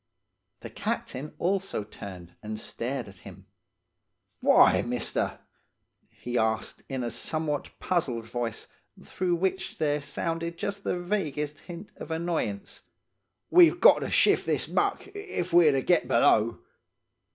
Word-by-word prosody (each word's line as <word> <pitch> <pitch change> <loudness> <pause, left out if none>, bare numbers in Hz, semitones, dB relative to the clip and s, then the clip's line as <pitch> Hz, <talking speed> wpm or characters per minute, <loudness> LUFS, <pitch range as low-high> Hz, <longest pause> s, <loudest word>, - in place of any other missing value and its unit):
The - - -8
captain 140 +4 -4
also 190 - -1
turned 90 -4 -10
and 110 0 -5
stared 125 +2 -4
at 95 -2 -14
him. - - -13 0.9
"'Why, - - +6
mister?' 120 0 -2 0.7
he 120 0 -3
asked, 110 0 -1
in 130 -2 -3
a 120 - -2
somewhat 155 -2 -2
puzzled 130 -11 -1
voice, 115 -1 -4 0.4
through 180 -1 -1
which 190 +2 -2
there 150 -2 0
sounded 165 +4 -3
just 200 +2 -4
the 180 - -1
vaguest 155 -6 -2
hint 175 +3 -10
of - - -8
annoyance. 160 -11 -3 0.7
'We've 350 -1 +7
got - - +7
to - - -3
shift - - +3
this - - 0
muck, - - 0
if 380 - -4
we're 170 -3 +7
to 135 -2 0
get 175 - +2
below. 115 0 +3
150 Hz, 130 wpm, -27 LUFS, 120-175 Hz, 0.9 s, We've